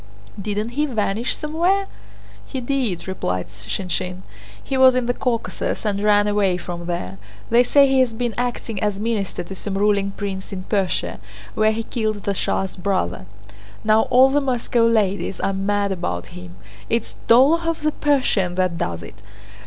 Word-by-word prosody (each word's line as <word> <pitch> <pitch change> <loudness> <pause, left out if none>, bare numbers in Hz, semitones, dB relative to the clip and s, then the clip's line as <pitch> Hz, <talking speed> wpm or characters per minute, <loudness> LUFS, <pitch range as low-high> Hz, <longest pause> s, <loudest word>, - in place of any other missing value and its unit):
"Didn't 210 +2 -2
he 295 +5 0
vanish 220 -1 -1
somewhere?" 345 +6 +1 0.6
"He 260 - -5
did," 240 -9 -2
replied 90 - -2
Shinshín. 180 - -4 0.4
"He 270 - -3
was 260 -1 +6
in 255 -1 +1
the 245 - +1
Caucasus 240 -2 -2
and 200 -1 0
ran 205 -1 +4
away 200 -3 +2
from 175 -1 -6
there. 95 - -4 0.3
They 235 +1 +6
say 280 +3 +5
he 265 0 +3
has 245 -3 +2
been 240 0 -1
acting 240 -4 -3
as 205 -2 0
minister 215 -5 -2
to 175 - -8
some 195 +1 -4
ruling 200 -1 +2
prince 195 -2 -4
in 185 -2 -5
Persia, 195 -2 -1 0.3
where 215 0 +3
he 225 +1 -2
killed 215 -3 -2
the 200 - 0
Shah's 190 0 -1
brother. 175 - -2 0.6
Now 215 +1 +4
all 260 +2 +6
the 290 +1 +3
Moscow 245 -3 +1
ladies 205 -4 +1
are 195 - 0
mad 200 +1 0
about 90 - -3
him! 90 0 -10 0.3
It's 230 -1 -1
'Dólokhov 320 +8 +4
the 305 0 +1
Persian' 255 -13 +1
that 180 -2 0
does 85 -1 -3
it! 100 +5 -12
210 Hz, 165 wpm, -22 LUFS, 185-245 Hz, 0.6 s, was